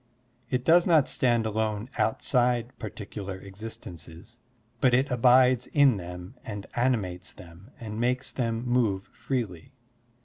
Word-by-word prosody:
It 125 0 -1
does 170 +2 +5
not 160 -5 +5
stand 120 -3 +1
alone 110 0 -1
outside 120 +1 +1
particular 100 -2 -6
existences, 100 0 -10 0.4
but 125 -2 +4
it 130 +2 +1
abides 125 0 +4
in 140 -6 +4
them 90 +2 -8
and 100 -2 -6
animates 110 -8 -1
them 90 +4 -14
and 110 -1 -6
makes 125 +2 0
them 115 -1 -2
move 115 -6 +1
freely. 110 -9 -4
115 Hz, 125 wpm, -27 LUFS, 100-125 Hz, 0.4 s, does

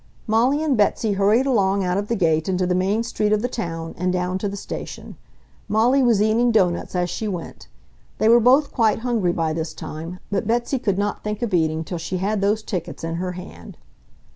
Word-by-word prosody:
Molly 250 +7 +2
and 295 -4 +2
Betsy 210 0 +1
hurried 205 +6 +3
along 200 -6 +2
out 180 0 0
of 200 +1 -2
the 235 - 0
gate 160 -4 +1
into 185 -1 +1
the 180 - +1
main 195 +5 +1
street 210 -2 -1
of 215 +1 +2
the - - +1
town 165 -9 -5
and 180 0 +1
down 180 +1 -1
to 205 - -2
the 200 - -6
station. - - -7 0.5
Molly 230 +6 +3
was 230 -5 +3
eating 230 +3 +3
doughnuts 185 -5 +1
as 180 -1 +1
she 215 +5 -4
went. 180 -5 -6 0.5
They 215 - +2
were 235 +1 +7
both 260 +5 +4
quite 220 -4 +2
hungry 230 -7 +1
by 165 -2 -1
this 160 0 -4
time, 165 +4 -7
but 200 0 -1
Betsy 240 +3 0
could 200 -6 0
not 205 0 -2
think 210 +2 -3
of 220 -5 -2
eating 160 -2 +1
till 175 +1 -5
she 185 +3 -3
had 200 +3 -1
those 210 +2 +1
tickets 175 -6 -5
in 165 0 -3
her 180 +1 -3
hand. 180 +1 -10
200 Hz, 215 wpm, -22 LUFS, 180-225 Hz, 0.5 s, were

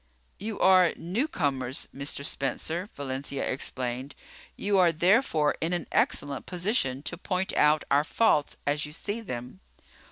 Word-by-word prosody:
"You 210 +2 -4
are 185 -2 +6
newcomers, 155 - -1
Mr. 140 0 -4
Spencer," 160 - -2
Valencia 140 0 -3
explained. 130 +1 -3 0.4
"You 200 -1 +1
are 175 -2 +5
therefore 165 - +3
in 165 +2 0
an 175 -3 -2
excellent 140 -2 +1
position 175 - 0
to 175 +3 -4
point 185 0 -1
out 150 0 +4
our 140 +1 +5
faults 155 -4 +2
as 145 +1 0
you 150 - -10
see 205 +7 -4
them." 125 - -7
155 Hz, 135 wpm, -28 LUFS, 140-185 Hz, 0.4 s, are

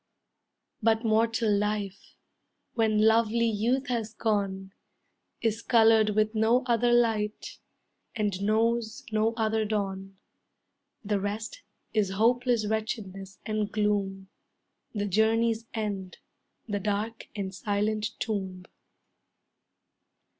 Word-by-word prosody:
But 225 +1 +2
mortal 225 -1 +2
life, 205 -1 -3 0.6
When 215 -2 +2
lovely 230 +1 +3
youth 230 +5 +1
has 225 -3 -2
gone, 195 -3 -1 0.7
Is 225 0 0
colored 220 -3 +4
with 215 0 +2
no 225 +3 +3
other 240 0 +2
light, 225 -3 +1 0.6
And 205 -4 -1
knows 225 +4 0
no 220 +1 +1
other 220 -1 +1
dawn. 195 -2 -3 0.9
The 205 -1 +1
rest 215 - -4 0.3
is 210 -3 +2
hopeless 240 +2 +2
wretchedness 200 -3 -4
and 215 -1 -1
gloom; 200 -2 -1 0.7
The 205 -1 -1
journey's 225 +3 +2
end, 200 -4 -4 0.5
the 205 -2 -1
dark 210 +3 -3
and 195 -2 -4
silent 210 +1 -1
tomb. 190 -4 -3
215 Hz, 100 wpm, -28 LUFS, 205-225 Hz, 0.9 s, colored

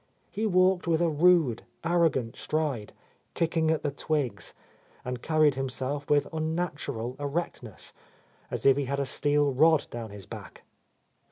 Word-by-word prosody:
He 220 +1 -1
walked 185 -1 +3
with 165 -1 +3
a 170 -1 +2
rude, 155 -6 +4 0.2
arrogant 160 -8 +1
stride, 150 -9 -2 0.4
kicking 165 -1 +1
at 160 -1 +1
the 145 - 0
twigs, 145 -3 -2 0.5
and 125 -1 -4
carried 155 -2 +3
himself 135 +2 -3
with 145 -1 +3
unnatural 155 -7 -3
erectness, 145 - -4 0.6
as - - -4
if 135 0 +6
he 140 - 0
had 140 +2 -2
a 140 - 0
steel 145 +1 +1
rod 155 +3 +4
down 115 -2 -6
his 100 -2 -10
back. - - -10
145 Hz, 145 wpm, -28 LUFS, 130-165 Hz, 0.6 s, if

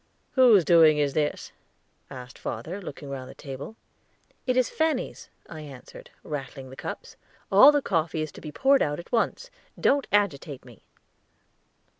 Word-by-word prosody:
"Whose 235 - +6
doing 160 -2 +6
is 145 -2 +1
this?" 150 0 -2 0.6
asked 125 -1 -10
father, 185 +5 -5
looking 145 -5 -9
round 130 -2 -6
the - - -12
table. 140 +8 -8 0.7
"It 255 0 +1
is 255 -2 +3
Fanny's," 315 -5 -2 0.2
I 160 -2 -9
answered, 140 -4 -12
rattling 135 -2 -7
the - - -10
cups. - - -8 0.3
"All 205 +9 +9
the 290 -2 0
coffee 160 -3 -1
to 155 - -12
be 155 - -7
poured 270 - +3
out 145 0 0
at 175 - -11
once, 255 - -1 0.3
don't 280 -1 +2
agitate 155 -10 0
me." 120 -4 -16
155 Hz, 150 wpm, -26 LUFS, 140-225 Hz, 0.7 s, All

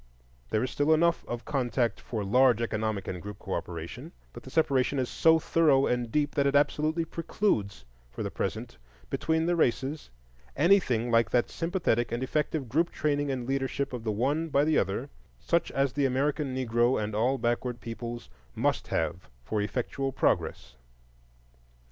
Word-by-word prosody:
There 110 +1 +1
is 130 - -2
still 150 +2 +3
enough 170 +1 +2
of 120 -1 -5
contact 120 -5 0
for 110 -4 -4
large 125 +3 +4
economic 110 -3 -2
and 90 -1 -4
group 105 -1 -8
cooperation, 90 - -6 0.2
but - - -9
the - - -11
separation 140 -4 +2
is 130 -2 0
so 160 0 +4
thorough 150 -4 +3
and 120 -2 -1
deep 145 +1 +1
that 140 0 +2
it 140 - +1
absolutely 155 +3 +2
precludes 155 - -1 0.2
for - - -6
the - - -3
present 65 - -4 0.3
between 160 0 0
the 175 +1 +2
races 140 0 0 0.5
anything 140 - +3
like 115 -1 +4
that 120 - +1
sympathetic 165 -10 0
and 120 +2 -2
effective 150 0 -1
group 160 +9 +1
training 145 -1 -1
and 130 -3 -2
leadership 135 0 -1
of 120 -3 -5
the 110 - -1
one 145 +10 0
by 140 -1 +3
the 155 0 +2
other, 105 +9 -2 0.3
such 170 0 0
as 135 -2 0
the 140 -1 +2
American 135 +1 -1
Negro 120 -1 +2
and 105 0 -3
all 120 +6 +1
backward 120 0 -1
peoples 120 - -6 0.3
must - - 0
have 80 -3 -2
for 105 - -1
effectual 130 +5 -2
progress. 65 - -1
130 Hz, 165 wpm, -28 LUFS, 115-150 Hz, 0.5 s, large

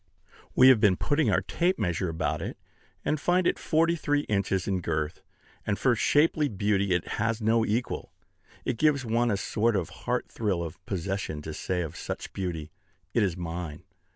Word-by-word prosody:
We 130 +1 +8
have 130 -4 +7
been 100 -4 +4
putting 150 +2 +1
our - - +3
tape 180 +2 +1
measure 90 +1 -1
about 80 0 -1
it, - - -5 0.5
and 150 - +1
find 180 +3 +2
it - - +2
forty 165 +1 +2
three 145 -2 +1
inches 100 -6 -1
in 95 -2 0
girth; 80 -2 -2 0.4
and 100 -1 -1
for 125 -2 +3
shapely 150 +5 +3
beauty 100 -1 +1
it 90 - -2
has 115 0 +1
no 115 +1 +3
equal. 115 +3 -2 0.5
It 115 - -2
gives 145 -4 +3
one 120 +1 +2
a 100 - +1
sort 110 +3 +1
of 90 -5 -1
heart - - -3
thrill 100 -6 -1
of 85 +2 -8
possession 95 -5 -3
to 80 - -5
say 90 +3 -2
of 80 - -6
such - - -6
beauty, 85 -5 -4 0.4
"It - - +3
is 90 -4 +1
mine." 85 -1 -5
105 Hz, 180 wpm, -28 LUFS, 90-125 Hz, 0.5 s, We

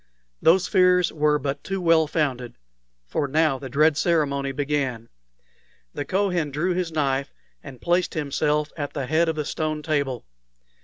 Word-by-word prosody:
Those 175 +3 +4
fears 180 -3 +3
were 150 -1 +2
but 140 0 -4
too 195 0 -3
well 165 -3 +3
founded, 130 -6 -2 0.5
for 140 - -2
now 150 -1 +1
the 135 - -7
dread 150 +4 +3
ceremony 140 -5 +1
began. 135 -5 -2 0.8
The 145 - -4
Kohen 185 -5 0
drew 160 +6 -1
his 175 -2 -2
knife, 140 -3 -1 0.3
and 130 - -10
placed 175 +1 0
himself 150 0 0
at 145 -3 -5
the 140 -3 -3
head 160 +4 +2
of 160 - -1
the 150 -1 -3
stone 155 0 -3
table. 140 -6 -1
150 Hz, 155 wpm, -24 LUFS, 140-165 Hz, 0.8 s, Those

